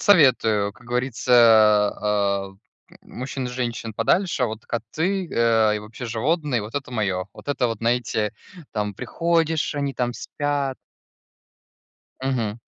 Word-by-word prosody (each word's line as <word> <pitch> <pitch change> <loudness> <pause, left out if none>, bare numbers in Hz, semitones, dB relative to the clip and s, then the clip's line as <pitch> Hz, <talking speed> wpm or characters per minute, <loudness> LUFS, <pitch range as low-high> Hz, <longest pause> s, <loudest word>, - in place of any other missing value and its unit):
советую, 115 - +4
как 120 +3 -19
говорится, 125 0 -1
а, 105 -3 +4
а, 95 - -18 0.5
мужчин 130 +1 -5
и - - -4
женщин 120 -3 -3
подальше, 155 - +1
вот 110 -2 -5
коты, 160 - -2
а, 115 -2 +3
и 105 - -1
вообще 115 +3 -8
животные, 130 +1 0
вот 110 +5 -9
это 140 -3 -4
моё. 95 -5 -1
Вот - - -13
это 130 -3 +1
вот, 115 -2 -3
знаете, 115 -2 0 0.4
там 105 -1 -2
приходишь, 160 - 0
они 140 -1 -2
там 120 -1 -1
спят. 145 0 -2 1.4
Мгм. 120 -4 -1
120 Hz, 130 wpm, -23 LUFS, 110-135 Hz, 1.4 s, советую